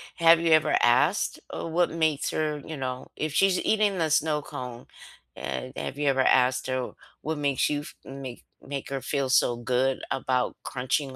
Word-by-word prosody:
have 165 0 +6
you 165 -1 +1
ever 155 -1 +4
asked, - - +3
uh, - - -5
what 170 +2 +2
makes 160 -3 0
her 150 -2 -1
you 160 -2 -6
know 130 -1 -4
if 155 -2 -3
she's 195 +1 +3
eating 210 -3 +2
the 160 -2 +1
snow 150 -1 +2
cone, 125 -3 -8 0.5
eh, 70 - -5
have - - -5
you 145 -1 -1
ever 135 -1 +3
asked 125 0 +3
her 130 -1 -2 0.3
what 155 0 -3
makes 140 -2 +1
you 145 0 -1
f - - -11
make 135 -2 -8 0.2
make 140 -1 -6
her 135 -1 -3
feel 140 -3 -1
so 120 -2 +3
good 130 +2 0
about 130 -1 0
crunching 130 +1 -2
140 Hz, 185 wpm, -26 LUFS, 130-155 Hz, 0.5 s, have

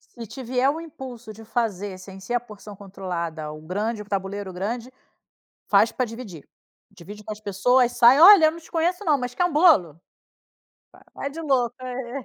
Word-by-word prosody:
se 235 -2 -12
te 265 +5 -9
vier 255 +3 +1
o 315 - -4
impulso 260 -8 -10
de 225 +1 -13
fazer 205 -5 -3
sem 190 +1 -12
ser 215 +6 -5
a 240 - +2
porção 210 -3 -12
controlada, 170 -6 -6
o 155 - -10
grande, 210 +7 -3
o - - -13
tabuleiro 195 -1 -4
grande, 230 +7 -5 0.8
faz - - +4
pra 255 - -1
dividir. 220 - -10 0.4
Divide 200 +3 -12
com 215 - -6
as 210 - -10
pessoas. 245 +5 +2
Sai: 245 +5 +6
“Olha, 370 -2 +9
eu - - +4
não 335 - -10
te 320 - -18
conheço 350 +4 -1
não, 300 -4 +2
mas 250 -1 -5
quer 355 - +1
um 355 - -4
bolo?” 275 - +4 0.9
Va - - -18
vai 280 - -5
de 325 +3 -8
louca: 265 -6 0
“Eh, 250 +1 -6
230 Hz, 195 wpm, -23 LUFS, 195-265 Hz, 0.9 s, Olha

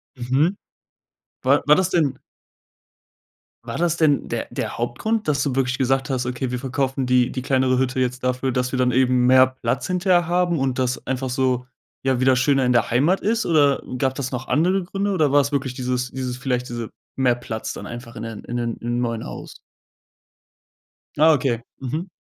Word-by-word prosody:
Mhm. 135 +9 +1 0.9
War 140 +3 +3
war 150 - +7
das 185 +1 +1
denn 150 -8 +1 1.4
war - - -5
das 170 0 +1
denn 150 -3 +2
der - - -3
der - - -4
Hauptgrund, 180 - -2
dass 140 -2 +1
du 140 - -1
wirklich 130 -1 0
gesagt 135 +1 +1
hast: 130 -2 -1
„Okay, 125 +1 -3
wir 125 - -2
verkaufen 135 0 -1
die 125 -1 +3
die 130 - -4
kleinere 130 -1 +2
Hütte 130 0 0
jetzt 125 0 -1
dafür, 125 +1 0
dass 125 0 -1
wir 130 - -2
dann 125 0 +3
eben 125 0 +3
mehr 130 +1 +7
Platz 130 -3 -3
hinterher 180 -1 +2
haben 175 -1 +1
und 130 -1 -1
das 125 -1 -1
einfach 130 0 -2
so, 125 -1 0 0.4
ja, 130 -1 +1
wieder 130 -1 +4
schöner 135 +1 +3
in 125 - +2
der 120 - +2
Heimat 145 +11 +2
ist,“ 230 +2 0
oder 145 -4 +3 0.2
gab 130 +1 0
das 135 -2 -4
noch 130 +1 -5
andere 180 +5 +2
Gründe 200 +3 -2
oder 155 -7 +2
war's 140 0 +3
wirklich 135 -3 -1
dieses 125 0 -2
dieses 125 -2 -4
vielleicht 125 -1 -2
diese 120 -2 -5 0.3
mehr 125 -2 +3
Platz 115 -2 -5
dann - - -8
einfach 120 0 -9
in 115 - -6
den 115 -2 -7
in 120 - -5
den 120 -1 -2
im 120 +1 -2
neuen 115 -2 -2
Haus? - - -8 1.6
Ah, 160 +1 +6
okay. 125 -4 0 0.2
Mhm. 155 +8 -4
130 Hz, 190 wpm, -22 LUFS, 125-145 Hz, 1.6 s, war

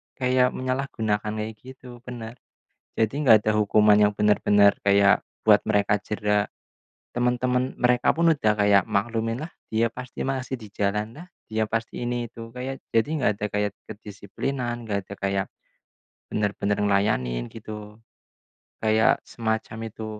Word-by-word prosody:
kayak 125 0 +2
menyalahgunakan 120 -5 -2
kayak 110 +1 -4
gitu 130 0 -12
benar. 120 -1 -8 0.6
Jadi 110 +2 +1
enggak 110 -6 +6
ada 110 - +2
hukuman 105 0 +4
yang 105 0 +4
benar-benar 105 -1 +4
kayak 100 0 +4 0.2
buat - - +6
mereka 105 0 +2
jera. 105 -1 0 0.7
Temen-temen 125 +1 0
mereka 125 -1 +3
pun 170 +1 +2
udah 110 -7 +2
kayak 100 -2 +4
maklum, 115 +2 -1
"Lah 155 - -5 0.2
dia 115 +1 +2
pasti 125 +2 -9
masih 130 -1 -3
di 110 - -10
jalan 105 +2 -2
lah, 175 +4 -10 0.2
dia 110 0 0
pasti 115 +2 -3
ini 120 0 -2
itu," 115 0 -10
kayak 130 +2 -6
jadi 115 +5 +2
enggak 135 -8 +2
ada 105 - 0
kayak 105 -1 -1 0.2
kedisiplinan 120 +4 -5
enggak 100 -3 -3
ada 100 - -8
kayak 100 0 -1 0.8
benar-benar 105 -1 -1
ngelayanin 80 - 0
gitu. 105 -1 -9 0.8
Kayak 110 0 +3
semacam 110 -1 -3
itu 110 +1 -7
110 Hz, 140 wpm, -25 LUFS, 105-125 Hz, 0.8 s, enggak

